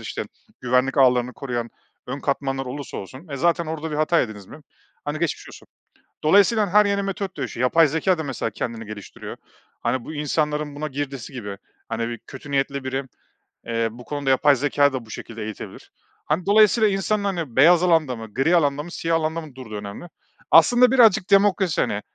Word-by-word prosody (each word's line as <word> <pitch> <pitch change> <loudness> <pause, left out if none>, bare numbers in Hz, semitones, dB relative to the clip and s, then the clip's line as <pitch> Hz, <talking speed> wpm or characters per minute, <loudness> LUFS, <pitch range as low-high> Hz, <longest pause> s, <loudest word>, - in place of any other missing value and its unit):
işte - - -5 0.4
güvenlik 125 +3 +1
ağlarını 125 -1 +4
koruyan 120 -2 -4 0.4
ön 135 +3 -5
katmanlar 135 -1 -2
olursa 140 +2 -6
olsun, 130 - -9
e, 140 - -5
zaten 170 +2 +1
orada 160 0 -4
bir 150 - -3
hata 155 +2 +2
yediniz 105 -5 -5
mi? 155 - -12 0.4
Hani 145 +1 -3
geçmiş 170 -2 -3
olsun. - - -14 0.6
Dolayısıyla 205 +5 +4
her 210 0 +6
yeni 200 0 0
metot 195 -2 -4
dönüşüyor. 125 -3 -4
Yapay 165 +4 +5
zekâ 165 +4 +1
da 160 - -3
mesela 135 -5 -3
kendini 115 +1 -5
geliştiriyor. 105 -1 -9 0.4
Hani, 120 +1 -1
bu 155 - -7
insanların 150 0 -1
buna 150 +1 -3
girdisi 140 -2 -5
gibi 105 -5 -6 0.3
hani 115 +1 -2
bir 120 - -5
kötü 140 +1 -10
niyetli 140 0 -1
biri, 135 +1 -2 0.6
eee, 115 0 0
bu 120 +2 -12
konuda 145 -2 -3
yapay 140 +2 +4
zekâyı 140 +1 +2
da 125 -3 -4
bu - - -18
şekilde 115 -1 -7
eğitebilir. 110 -1 -9 0.3
Hani, 160 +4 -1
dolayısıyla 215 +1 +5
insanlar 200 0 -1
hani 150 -9 -5
beyaz 170 +6 +6
alanda 160 -7 +2
mı, 110 -2 -10
gri 160 +7 +2
alanda 145 -2 +1
mı, 175 - -10
siyah 165 -1 -1
alanda 160 +1 -1
mı 150 -5 -12
durduğu 120 -5 -9
önemli. 105 +9 -7 0.5
Aslında 245 +9 +6
birazcık 220 -6 +5
demokrasi. 195 -3 +3
Hani, 100 - -1
145 Hz, 185 wpm, -23 LUFS, 125-170 Hz, 0.6 s, her